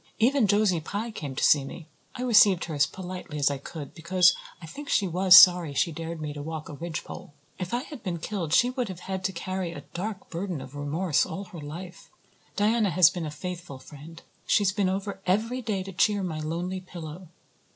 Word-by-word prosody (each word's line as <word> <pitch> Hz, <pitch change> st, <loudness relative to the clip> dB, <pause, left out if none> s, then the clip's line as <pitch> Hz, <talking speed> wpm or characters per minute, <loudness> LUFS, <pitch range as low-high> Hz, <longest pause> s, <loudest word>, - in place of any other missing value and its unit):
Even 245 Hz, 0 st, +3 dB
Josie 205 Hz, -4 st, +2 dB
Pye 210 Hz, +8 st, -4 dB
came 145 Hz, -10 st, -6 dB
to -, -, -2 dB
see 145 Hz, -2 st, +5 dB
me. 150 Hz, +4 st, -9 dB, 0.3 s
I 250 Hz, -, -4 dB
received 210 Hz, -7 st, +5 dB
her 165 Hz, -, -6 dB
as 145 Hz, -1 st, +3 dB
politely 180 Hz, -4 st, -7 dB
as 145 Hz, -1 st, +2 dB
I 140 Hz, -, -4 dB
could, 145 Hz, 0 st, -8 dB
because 180 Hz, +2 st, +4 dB, 0.3 s
I 170 Hz, -, -10 dB
think 285 Hz, -, -9 dB
she 200 Hz, -, +2 dB
was 180 Hz, +1 st, +7 dB
sorry 175 Hz, -5 st, +7 dB
she 170 Hz, -, +1 dB
dared 165 Hz, +1 st, -6 dB
me 150 Hz, -1 st, -4 dB
to 145 Hz, -, -7 dB
walk 160 Hz, +1 st, -6 dB
a -, -, -7 dB
ridgepole. 165 Hz, -1 st, -7 dB, 0.3 s
If 180 Hz, -1 st, -4 dB
I 245 Hz, +2 st, -1 dB
had 290 Hz, -4 st, -10 dB
been 180 Hz, -4 st, -3 dB
killed 170 Hz, -2 st, -4 dB
she 245 Hz, +9 st, +4 dB
would 255 Hz, -2 st, -2 dB
had 190 Hz, +1 st, -5 dB
to 190 Hz, -, +1 dB
carry 185 Hz, 0 st, -4 dB
a 145 Hz, -, -8 dB
dark 195 Hz, +2 st, -5 dB
burden 180 Hz, -2 st, -3 dB
of 130 Hz, +1 st, -10 dB
remorse 145 Hz, +2 st, 0 dB
all 195 Hz, -, -5 dB
her 175 Hz, -3 st, -11 dB
life. 170 Hz, +5 st, -9 dB, 0.5 s
Diana 215 Hz, 0 st, +2 dB
has 175 Hz, 0 st, +6 dB
been 175 Hz, -3 st, -4 dB
a -, -, -4 dB
faithful 170 Hz, -1 st, -7 dB
friend. 150 Hz, +5 st, -13 dB, 0.2 s
She's 205 Hz, -3 st, +3 dB
been 195 Hz, -1 st, 0 dB
over 195 Hz, +1 st, -3 dB
every 225 Hz, +7 st, +1 dB
day 210 Hz, -5 st, -2 dB
to 195 Hz, -, -8 dB
cheer 205 Hz, +2 st, +2 dB
my 160 Hz, -4 st, -3 dB
lonely 170 Hz, +4 st, -3 dB
pillow. 175 Hz, -1 st, -9 dB
180 Hz, 210 wpm, -27 LUFS, 160-195 Hz, 0.5 s, was